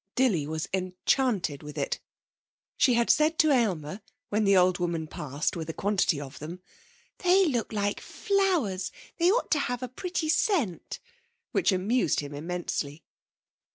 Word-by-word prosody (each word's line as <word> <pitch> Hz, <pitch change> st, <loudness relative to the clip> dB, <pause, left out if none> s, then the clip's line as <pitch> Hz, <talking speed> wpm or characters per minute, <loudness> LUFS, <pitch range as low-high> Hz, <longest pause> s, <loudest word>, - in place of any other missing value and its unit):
Dilly 200 Hz, -, +2 dB
was 155 Hz, 0 st, -3 dB
enchanted 185 Hz, -, 0 dB
with 150 Hz, 0 st, -9 dB
it. 140 Hz, -, -1 dB, 0.8 s
She 255 Hz, -4 st, +4 dB
had 235 Hz, 0 st, +4 dB
said 310 Hz, +2 st, +3 dB
to 310 Hz, -2 st, +4 dB
Aylmer 195 Hz, -, 0 dB, 0.3 s
when 210 Hz, +1 st, +1 dB
the 195 Hz, -1 st, +5 dB
old 180 Hz, 0 st, +4 dB
woman 170 Hz, -2 st, -1 dB
passed 150 Hz, -1 st, -3 dB
with 165 Hz, -2 st, -5 dB
a 160 Hz, -, -4 dB
quantity 195 Hz, -6 st, +1 dB
of 140 Hz, -1 st, -8 dB
them. 170 Hz, +5 st, -8 dB, 0.6 s
'They 375 Hz, +1 st, +4 dB
look 240 Hz, -5 st, -1 dB
like 205 Hz, -1 st, -1 dB
flowers; 355 Hz, -, 0 dB, 0.3 s
they 340 Hz, +1 st, +5 dB
ought -, -, 0 dB
to 305 Hz, -, +3 dB
have 245 Hz, -2 st, -2 dB
a -, -, -2 dB
pretty 325 Hz, +6 st, -3 dB
scent,' 310 Hz, -, 0 dB, 0.5 s
which -, -, +2 dB
amused 200 Hz, +7 st, +1 dB
him 145 Hz, 0 st, -5 dB
immensely. 155 Hz, -1 st, -4 dB
195 Hz, 155 wpm, -28 LUFS, 160-265 Hz, 0.8 s, the